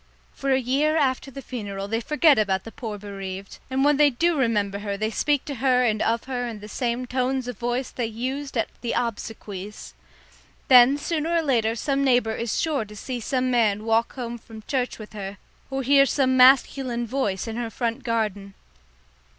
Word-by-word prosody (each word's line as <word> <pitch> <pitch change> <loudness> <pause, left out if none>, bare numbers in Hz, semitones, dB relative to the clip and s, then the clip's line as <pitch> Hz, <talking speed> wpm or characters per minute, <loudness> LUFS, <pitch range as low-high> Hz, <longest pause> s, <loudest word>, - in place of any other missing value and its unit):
For 275 - -4
a 260 - +4
year 280 +5 +1
after 270 -2 0
the 275 +1 -9
funeral 200 -6 -5
they 225 +2 -1
forget 300 0 +4
about 190 -3 +1
the 225 - -9
poor 220 -4 -6
bereaved, 195 -1 -7
and 265 +1 +1
when 295 -1 +4
they 295 0 +6
do 335 +6 +1
remember 210 -7 0
her 200 -1 -3
they 215 +2 -1
speak 290 +4 0
to 290 - -4
and 250 -4 +2
of 230 +1 +1
her 250 -2 -3
in 225 -3 -6
the 210 - -10
same 240 +2 -2
tones 255 0 -1
of 245 -5 -6
voice 245 +2 -2
they 240 -3 -2
used 260 +5 -4
at 225 - 0
the 240 - -2
obsequies. 210 -3 -5 0.8
Then 255 +2 +8
sooner 325 +2 -1
or 335 - +2
later 230 -6 +1
some 275 +4 0
neighbour 245 -4 +2
is 235 -1 -2
sure 300 -7 0
to 210 0 -12
see 250 +4 -5
some 255 +2 -1
man 215 -3 +2
walk 225 +1 +1
home 240 -2 -5
from 220 -1 -12
church 255 -3 -1
with 215 -1 -11
her, 200 -1 -6 0.3
or 270 0 -2
hear 275 +1 +5
some 260 -1 +2
masculine 255 -1 +4
voice 225 -5 -2
in 225 0 -4
her 240 -1 -3
front 235 +3 -3
garden. 210 -4 -2
240 Hz, 190 wpm, -24 LUFS, 215-270 Hz, 0.8 s, Then